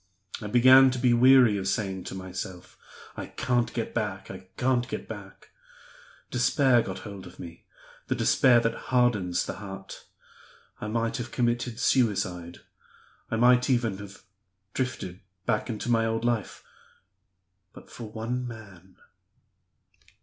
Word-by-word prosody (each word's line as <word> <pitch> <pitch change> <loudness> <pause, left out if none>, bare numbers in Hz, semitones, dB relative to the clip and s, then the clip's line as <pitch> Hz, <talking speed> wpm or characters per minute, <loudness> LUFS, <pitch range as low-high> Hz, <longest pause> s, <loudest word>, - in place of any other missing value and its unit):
I 105 - -5
began 130 +4 +7
to 130 - -3
be 125 -1 +3
weary 125 -3 +6
of 95 - -3
saying 95 -3 -2
to - - -6
myself, 95 -1 -7 0.4
'I - - -6
can't 120 -1 +1
get 115 -2 -4
back! 100 -4 -3
I 95 -1 -11
can't 125 -1 +1
get 130 - -6
back!' - - -11 0.8
Despair 125 0 +3
got - - -5
hold 100 -3 -8
of 90 - -14
me, 85 -1 -10 0.4
the - - 0
despair 125 -3 +4
that 115 - 0 0.2
hardens 115 -9 +2
the - - -6
heart. 95 -2 -9 0.7
I - - -5
might 115 +1 -1
have 120 -1 -5
committed 120 -1 -1
suicide; 90 -10 0 0.7
I - - -1
might 125 +2 +4
even 115 -6 +1
have 100 -1 -11 0.5
drifted 125 -8 -3 0.3
back 105 +4 0
into 110 0 -4
my 115 -1 +3
old 115 +1 -2
life 120 -4 -2 1.1
but - - -15
for 115 -3 -8
one 120 +3 -3
man." 100 -5 -12
115 Hz, 140 wpm, -27 LUFS, 95-125 Hz, 1.1 s, began